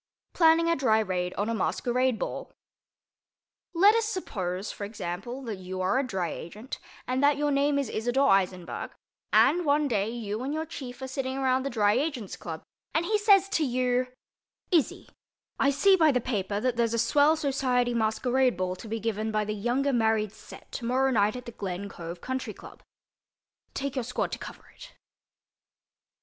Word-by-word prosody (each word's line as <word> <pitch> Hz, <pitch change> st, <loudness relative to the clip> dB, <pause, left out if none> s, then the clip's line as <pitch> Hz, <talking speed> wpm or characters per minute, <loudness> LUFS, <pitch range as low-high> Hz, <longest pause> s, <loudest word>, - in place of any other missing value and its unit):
PLANNING 330 Hz, 0 st, +5 dB
A 335 Hz, -, +3 dB
DRY 240 Hz, -6 st, +3 dB
RAID 180 Hz, -4 st, -1 dB
ON 205 Hz, -, -1 dB
A 230 Hz, -, 0 dB
MASQUERADE 250 Hz, +3 st, 0 dB
BALL -, -, -5 dB, 1.2 s
Let 400 Hz, +5 st, +7 dB
us 455 Hz, 0 st, +2 dB
suppose, 195 Hz, -, -3 dB
for -, -, -8 dB
example, 205 Hz, +5 st, -5 dB
that 225 Hz, -5 st, -4 dB
you 185 Hz, 0 st, -6 dB
are 190 Hz, +8 st, +2 dB
a -, -, +1 dB
Dry 185 Hz, -7 st, -2 dB
Agent 210 Hz, +9 st, -7 dB, 0.3 s
and 255 Hz, +1 st, 0 dB
that 285 Hz, 0 st, +4 dB
your 295 Hz, 0 st, +1 dB
name 280 Hz, +1 st, +2 dB
is 280 Hz, -3 st, 0 dB
Isador 245 Hz, +6 st, +1 dB
Eisenberg, 185 Hz, -4 st, 0 dB, 0.4 s
and, 350 Hz, +3 st, +5 dB
one 295 Hz, -1 st, +2 dB
day, 210 Hz, -4 st, 0 dB
you 225 Hz, -2 st, -4 dB
and 275 Hz, +4 st, -2 dB
your 315 Hz, +1 st, -2 dB
chief 265 Hz, -5 st, -8 dB
are -, -, -3 dB
sitting 265 Hz, 0 st, -3 dB
around 260 Hz, -1 st, +2 dB
the 275 Hz, -, -2 dB
Dry 210 Hz, -4 st, +3 dB
Agent's 255 Hz, -, -2 dB
Club 160 Hz, -1 st, -7 dB, 0.3 s
and 325 Hz, +2 st, +2 dB
he 425 Hz, +3 st, +1 dB
says 400 Hz, -2 st, +5 dB
to 335 Hz, -6 st, +1 dB
you, 250 Hz, -1 st, +1 dB, 0.6 s
"Izzy—I 300 Hz, -3 st, -1 dB
see 380 Hz, +8 st, +5 dB
by 320 Hz, -4 st, +5 dB
the 250 Hz, -, +2 dB
paper 205 Hz, -4 st, -2 dB
that 245 Hz, +1 st, 0 dB
there's 230 Hz, -1 st, +1 dB
a -, -, 0 dB
swell 285 Hz, +7 st, +4 dB
society 255 Hz, -4 st, +1 dB
masquerade 245 Hz, +1 st, +1 dB
ball 185 Hz, 0 st, -1 dB
to 225 Hz, -, -10 dB
be 225 Hz, +1 st, -3 dB
given 220 Hz, 0 st, -2 dB
by 215 Hz, 0 st, 0 dB
the 215 Hz, -, -2 dB
younger 245 Hz, +7 st, 0 dB
married 220 Hz, -3 st, +2 dB
set 220 Hz, -, -14 dB
tomorrow 255 Hz, +3 st, +1 dB
night 210 Hz, -2 st, +2 dB
at 250 Hz, 0 st, -7 dB
the 235 Hz, -, -7 dB
Glen 195 Hz, -2 st, -5 dB
Cove 170 Hz, -1 st, -8 dB
Country 260 Hz, 0 st, -4 dB
Club. -, -, -13 dB, 0.9 s
Take 280 Hz, -1 st, -2 dB
your 260 Hz, -, -1 dB
squad 250 Hz, +2 st, -2 dB
to -, -, -4 dB
cover -, -, -10 dB
it." -, -, -13 dB
245 Hz, 180 wpm, -28 LUFS, 210-280 Hz, 1.2 s, Let